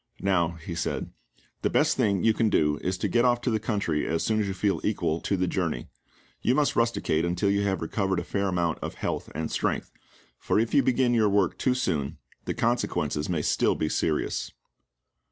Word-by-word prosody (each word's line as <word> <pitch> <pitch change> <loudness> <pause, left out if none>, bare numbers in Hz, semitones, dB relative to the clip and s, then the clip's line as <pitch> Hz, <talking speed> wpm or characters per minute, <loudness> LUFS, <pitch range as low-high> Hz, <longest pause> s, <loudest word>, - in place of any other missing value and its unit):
"Now," 85 -4 +2
he 85 +1 -7
said, 85 - -3 0.5
"the - - +1
best - - +3
thing 100 -4 +1
you 110 - +5
can 110 0 +2
go 75 -6 +2
is 95 0 -1
to - - -1
get 120 0 +2
off 120 -1 +3
to 125 - 0
the 110 - +1
country 100 -8 -1
as 80 0 0
soon 110 -1 +1
as 105 - 0
you 95 - -2
feel 100 +1 0
equal 80 +2 0
to 100 - 0
the 90 - +1
journey. 85 -9 -2 0.5
You 125 - +2
must 150 0 +2
rusticate 115 -8 +1
until 90 +3 +1
you 100 0 +2
have 95 -3 -1
recovered 95 +2 0
a - - -4
fair 100 -1 -1
amount 85 -3 0
of - - -5
health - - -3
and 80 0 -3
strength, - - -1 0.5
for - - 0
if 115 +1 0
you 145 - +6
begin 125 -1 +2
your 110 -3 +3
work 100 -2 +2
too 130 -1 +2
soon 75 - -1 0.3
the - - -2
consequences 115 -10 0
may 80 -4 0
still - - +2
be 80 - -1
serious." 75 -1 -1
95 Hz, 210 wpm, -27 LUFS, 85-115 Hz, 0.5 s, you